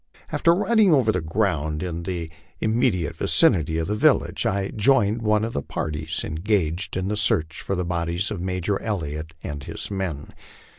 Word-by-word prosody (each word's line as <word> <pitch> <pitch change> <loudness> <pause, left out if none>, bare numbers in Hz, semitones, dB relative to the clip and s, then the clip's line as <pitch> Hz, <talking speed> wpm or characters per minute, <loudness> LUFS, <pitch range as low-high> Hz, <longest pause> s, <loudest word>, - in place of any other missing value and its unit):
After 170 0 +3
riding 210 0 +4
over 130 -7 +4
the 95 - -1
ground 80 -3 -1
in 85 -2 -3
the 85 -2 -4 0.3
immediate 110 - +1
vicinity 80 - +3
of 80 - -1
the 105 - 0
village, 105 - +2
1 95 0 -1
joined 110 -1 +3
one 105 -1 +2
of 115 - -3
the 70 - -1
parties 75 +1 -3
engaged 90 +1 -1
in 95 0 -1
the 105 - -1
search 80 -6 0
for 100 - -2
the 90 -1 -2
bodies 85 +3 -1
of 100 -5 -4
Major 95 +2 -1
Elliott 80 -7 -4
and 70 -1 -5
his - - -4
men. 90 -7 -4
90 Hz, 170 wpm, -24 LUFS, 80-105 Hz, 0.3 s, riding